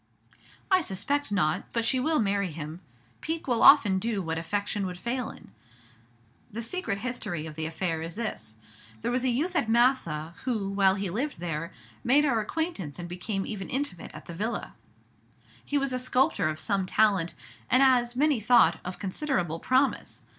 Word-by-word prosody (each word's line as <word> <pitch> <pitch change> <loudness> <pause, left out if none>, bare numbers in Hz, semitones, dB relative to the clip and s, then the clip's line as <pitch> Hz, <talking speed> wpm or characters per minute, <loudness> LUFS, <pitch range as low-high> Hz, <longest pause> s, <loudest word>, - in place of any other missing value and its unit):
"I 375 -1 +6
suspect 280 - -2
not; 180 -7 +1
but 230 -1 0
she 260 +2 +2
will 310 +4 +1
marry 200 - +1
him. 155 +2 -7 0.4
Pique 320 0 -3
will 240 -3 +1
often 190 -3 +7
do 220 0 -1
what 160 -1 -2
affection 200 +3 -2
would 180 -1 -6
fail 240 +5 -2
in. - - -13 1.0
The 230 +3 -4
secret 295 - -2
history 200 -9 -4
of 155 - -7
the 160 +1 -3
affair 165 0 -2
is 165 +2 -6
this: 215 - -5 0.5
There - - 0
was 250 +1 0
a 260 - +2
youth 310 +10 0
at 240 -9 +1
Massa, 225 - +2
who, 220 -7 -1
while 195 -1 +3
he 195 -2 -3
lived 265 - -3
there, 165 -1 -3 0.3
made 285 +5 +4
our 240 -6 +2
acquaintance 215 - -3
and 175 -1 -6
became 195 +3 -3
even 195 -3 -5
intimate 260 - -2
at 155 - -11
the 170 - -8
Villa: 210 +6 -3 0.9
he 290 - -1
was 275 -2 0
a 255 - -1
sculptor 255 - +2
of 155 0 -4
some 195 0 0
talent, 195 -5 +2 0.3
and, 255 +2 +5
as 245 -2 +3
many 290 -1 +3
thought, 215 -7 +5
of 180 0 -6
considerable 190 - -2
promise. 260 +6 +1
210 Hz, 175 wpm, -28 LUFS, 175-255 Hz, 1.0 s, often